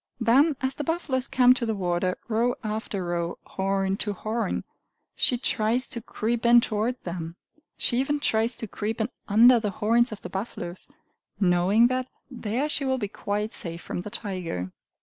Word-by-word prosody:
Then 270 +7 +4
as 260 +1 0
the 295 - -4
buffaloes 285 -5 -1
come 250 -1 +6
to 255 - -3
the 225 -2 0
water, 180 -1 0
row 235 +2 +1
after 215 -3 -3
row, 170 0 -2
horn 195 0 -1
to 205 0 -1
horn, 215 +1 -2 0.5
she 245 - +3
tries 235 0 +1
to 235 - -5
creep 230 +1 -2
in 240 0 +7
toward 230 +1 0
them; 170 -1 -5 0.4
she 240 - +1
even 290 +3 +1
tries 225 -3 +1
to 225 - -5
creep 220 +3 -4
in 220 +2 0 0.2
under 235 +4 +7
the 215 -2 -1
horns 230 +5 +2
of 215 - -7
the - - -4
buffaloes, 190 -3 -5 0.5
knowing 190 +4 +4
that 255 +1 0 0.2
there 240 +3 -2
she 295 -1 -1
will 265 -1 +1
be 210 -5 -2
quite 210 +2 -3
safe 170 0 -4
from - - -4
the 180 - -6
tiger. 180 - -4
220 Hz, 175 wpm, -26 LUFS, 195-245 Hz, 0.5 s, in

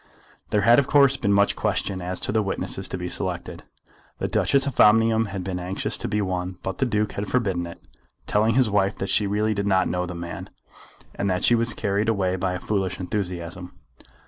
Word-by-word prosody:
There 105 -1 +2
had 120 +5 +6
of 140 - 0
course 140 -2 +5
been 100 -7 0
much 100 0 +3
question 95 -2 -1
as 90 +1 -2
to - - 0
the 110 +1 +2
witnesses 100 -2 -3
to - - -4
be - - -4
selected. - - -3 0.6
The - - -2
Duchess 140 0 +2
of 140 -4 -4
Omnium 115 +1 +5
had 100 -2 -5
been 90 -1 -3
anxious 90 +2 -3
to - - -2
be 105 0 0
one, 90 -1 -3
but 95 - -4
the 130 - +2
Duke 105 -2 0
had 100 +1 -4
forbidden 95 -8 0
it, 85 - -10 0.5
telling 110 +2 +2
his 130 -2 +4
wife 100 -1 +1
that 95 - -4
she 105 - +2
really 105 +2 0
did 100 0 -2
not 95 -2 +3
know 90 0 -2
the 90 - -6
man, 85 0 -7 0.6
and 100 - -2
that 90 -1 -1
she - - +5
was 115 -1 +2
carried 105 +1 0
away 95 -4 +1
by 95 0 -1
a 90 - -3
foolish 95 -3 -2
enthusiasm. 90 -2 -4
100 Hz, 215 wpm, -24 LUFS, 90-110 Hz, 0.6 s, had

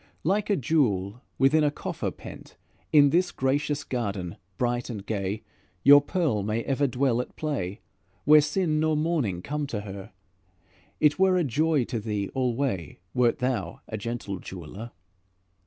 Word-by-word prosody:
Like 200 +6 +1
a 205 - +4
jewel 120 - 0 0.2
within 150 +4 +4
a 150 - +4
coffer 145 - -4
pent, - - -11 0.3
In 145 -2 +6
this 175 +1 +2
gracious 145 +2 0
garden 100 -8 -3 0.2
bright 120 0 -1
and 105 -4 -6
gay, 100 0 -3 0.4
Your 145 +1 +9
pearl 145 - 0
may 110 +3 -1
ever 140 +1 +1
dwell 125 -1 +1
at - - -10
play, 115 - -3 0.4
Where 150 +1 +8
sin 155 +1 0
nor 155 0 +2
mourning 145 - 0
come 150 0 -3
to 115 -7 -3
her; 100 +1 -8 0.9
It 150 +2 +3
were 190 -1 +4
a 180 - +2
joy 150 +1 +2
to 115 -1 -3
thee 105 -2 -3
alway 125 - -1 0.2
Wert 125 -2 +3
thou 120 -9 -2
a - - -5
gentle 110 -3 -4
jeweler. 95 +6 -8
125 Hz, 155 wpm, -26 LUFS, 105-150 Hz, 0.9 s, Your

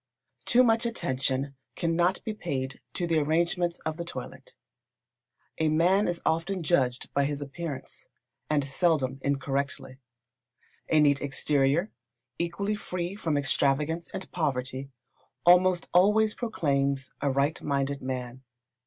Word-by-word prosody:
Too 250 +1 +5
much 230 0 +3
attention 135 - -2 0.2
cannot 175 +2 +1
be 220 - -3
paid 135 -10 -4
to 175 - 0
the 165 -2 +2
arrangements 170 +3 +1
of 160 0 -2
the 170 - -3
toilet. - - -8 1.0
A 160 -1 +3
man 180 +6 +3
is 175 -1 -2
often 170 +3 0
judged 130 -6 +1
by 140 0 +2
his 145 0 -2
appearance, 145 0 -7 0.4
and 150 -2 +2
seldom 140 -3 +1
incorrectly. 135 -1 -2 0.9
A 155 - +4
neat 145 -2 +4
exterior, 145 +5 +1 0.5
equally 170 +5 -1
free 180 -3 -4
from 165 -8 -1
extravagance 145 +4 0
and 190 - -7
poverty, 135 -4 -2 0.6
almost 180 0 +5
always 210 +4 +5
proclaims 140 - -1
a 140 - +1
right 140 +3 +1
minded 140 -1 -1
man. 130 -1 -5
155 Hz, 125 wpm, -28 LUFS, 140-175 Hz, 1.0 s, Too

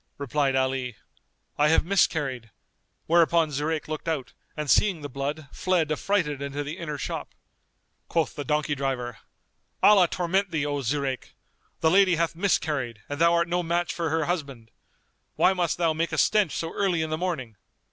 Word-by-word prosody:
Replied 140 0 0
Ali, 130 -2 0 0.6
"I 150 - +5
have 160 - +3
miscarried"; 145 - +1 0.6
whereupon 165 -1 +3
Zurayk 150 +2 -2
looked 155 +1 -5
out 155 -6 -2 0.2
and 150 -1 -3
seeing 185 +2 +3
the 145 - -6
blood 140 +3 -4
fled 175 -4 0
affrighted 155 -3 0
into 140 +1 -3
the 150 +5 -6
inner 150 -3 -4
shop. - - -5 0.7
Quoth 165 -2 0
the 145 - -5
donkey 150 0 0
driver, 130 -4 -3 0.6
"Allah 195 -4 +7
torment 185 +3 0
thee, 155 -3 -1
O 145 -1 -2
Zurayk! 135 0 -2 0.5
The 160 - +4
lady 190 -1 +5
hath 165 0 0
miscarried 145 - -1
and 145 +2 -4
thou 170 0 +6
art 170 0 +2
no 175 +1 0
match 175 +1 -1
for 170 -2 -2
her 160 0 0
husband. 140 -10 -4 0.6
Why 190 - +4
must 175 -3 0
thou 165 -2 +2
make 165 +2 -1
a 160 - -2
stench 200 +3 +3
so 165 - -4
early 180 -5 +1
in 160 - -4
the - - +1
morning? 150 -12 -3
155 Hz, 170 wpm, -26 LUFS, 140-170 Hz, 0.7 s, Allah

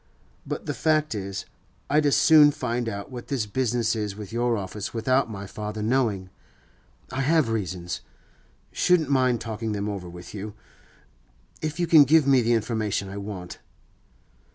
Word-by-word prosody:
But - - -4
the - - -2
fact 155 -1 +1
is, 100 -2 -5 0.4
I'd 150 +1 +3
as 140 - +3
soon 155 -2 +7
find 125 -5 -2
out 100 +4 -6
what 120 -2 -8
this 130 -6 -1
business 115 +1 0
is 105 -2 -3
with 105 0 -9
your 120 0 +1
office 105 +4 -5
without 130 +2 +1
my 100 -2 -6
father 105 +2 -5
knowing. 110 -6 0 0.8
I 130 +1 -2
have 155 -1 +3
reasons; 90 -5 -3 0.7
shouldn't 175 -5 +2
mind 130 -3 +2
talking 110 -1 -3
them 100 0 -2
over 100 -4 -5
with 90 0 -11
you, 105 0 -6 1.1
if 155 +2 -3
you 175 - +2
can 160 -3 +8
give 155 +1 +5
me 135 -2 +5
the 120 +1 +2
information 110 -3 -1
I 100 - -7
want. 100 -3 -7
115 Hz, 160 wpm, -25 LUFS, 100-135 Hz, 1.1 s, can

